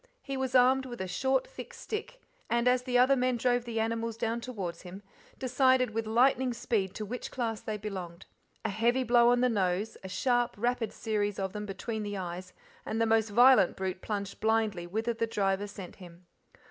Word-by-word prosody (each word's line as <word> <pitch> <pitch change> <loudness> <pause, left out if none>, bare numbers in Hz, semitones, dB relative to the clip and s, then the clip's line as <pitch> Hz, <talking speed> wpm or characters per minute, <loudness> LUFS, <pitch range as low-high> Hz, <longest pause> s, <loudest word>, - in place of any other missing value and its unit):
He 275 - -4
was 265 -1 -2
armed 260 +1 +5
with 240 -1 -8
a 190 - -3
short 265 +9 +1
thick - - -10
stick, 450 +3 -6 0.3
and, 235 +1 +1
as 250 0 +4
the 250 -1 0
other 255 +2 +5
men 255 -1 +1
drove 245 0 +1
the 230 -1 -3
animals 225 0 -2
down 230 +1 -1
towards 205 -9 -5
him, 190 +2 -10 0.3
decided 255 -1 +2
with 225 0 -3
lightning 250 +2 +3
speed 200 -5 -1
to 215 - -4
which 245 +4 -5
class 225 -4 -3
they 215 -1 -4
belonged. 190 -4 -7 0.4
A - - +1
heavy 240 +5 +1
blow 240 0 +5
on 245 0 +3
the 250 - +4
nose, 200 -2 -1
a 190 - -7
sharp, 240 +5 +1
rapid 235 0 -1
series 205 -2 -2
of 190 -1 -3
them 210 0 -5
between 220 +3 -4
the 205 -1 -4
eyes, 180 0 -6 0.3
and 220 - -3
the 230 - +3
most 225 -1 +2
violent 245 -2 +6
brute 190 -1 -3
plunged 200 -2 -4
blindly 220 -5 0
whither 220 +6 -1
the 230 0 -1
driver 200 -2 0
sent 195 -3 -10
him. 175 -1 -14
225 Hz, 200 wpm, -30 LUFS, 200-245 Hz, 0.4 s, violent